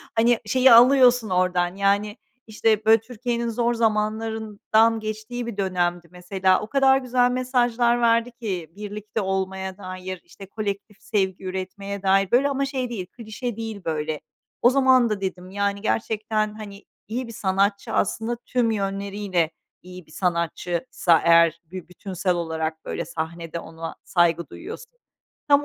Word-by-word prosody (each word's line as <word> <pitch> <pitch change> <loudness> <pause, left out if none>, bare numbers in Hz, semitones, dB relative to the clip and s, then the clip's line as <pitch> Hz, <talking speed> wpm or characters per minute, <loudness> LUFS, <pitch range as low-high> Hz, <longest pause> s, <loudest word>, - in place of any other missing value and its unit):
hani, 230 +1 +4
şeyi 255 +4 +5
alıyorsun 245 -1 +6
oradan, 180 -1 +1
yani, 200 +2 +1 0.3
işte, 220 0 +1
böyle, 220 0 +6
Türkiye'nin 235 0 -3
zor 235 +1 0
zamanlarından 220 0 +1
geçtiği 215 +3 -5
bir 230 -3 -6
dönemdi 175 -3 -1
mesela. 185 +1 +1
O 215 - -6
kadar 270 +1 +4
güzel 250 -1 +2
mesajlar 245 -1 +1
verdi 230 +1 +3
ki 190 -9 -5
birlikte 210 +1 -5
olmaya 190 0 -3
dair, 185 -1 -7
işte, 185 +3 -13
kolektif 200 0 -5
sevgi 195 -4 -1
üretmeye 190 +2 -5
dair, 195 0 +3
böyle, 270 +4 +4
ama 275 0 0
şey 260 -2 -3
değil, 210 -6 -4
klişe 230 +3 -6
değil, 225 -3 -5
böyle. 155 -1 -2 0.4
O 240 - +7
zaman 260 -2 +4
da 210 -2 -2
dedim 185 -1 -4
yani 200 0 -1
gerçekten; 215 -1 -1
hani, 205 -2 -10 0.2
"İyi 240 +4 -3
bir 230 - -9
sanatçı, 200 0 0
aslında 225 +4 0
tüm 240 -3 +1
yönleriyle 195 -4 -1 0.3
iyi 180 -1 -11
bir 155 - -21
sanatçıysa 170 +1 0
eğer 170 0 +5
bir 180 +2 -9
bütünsel 180 0 -2
olarak 160 -1 -3
böyle - - -4
sahnede 165 +1 -5
ona 165 0 -8
saygı 170 -2 +1
duyuyorsun." 455 +7 -9 0.6
Tam 290 0 +5
205 Hz, 145 wpm, -24 LUFS, 185-235 Hz, 0.6 s, O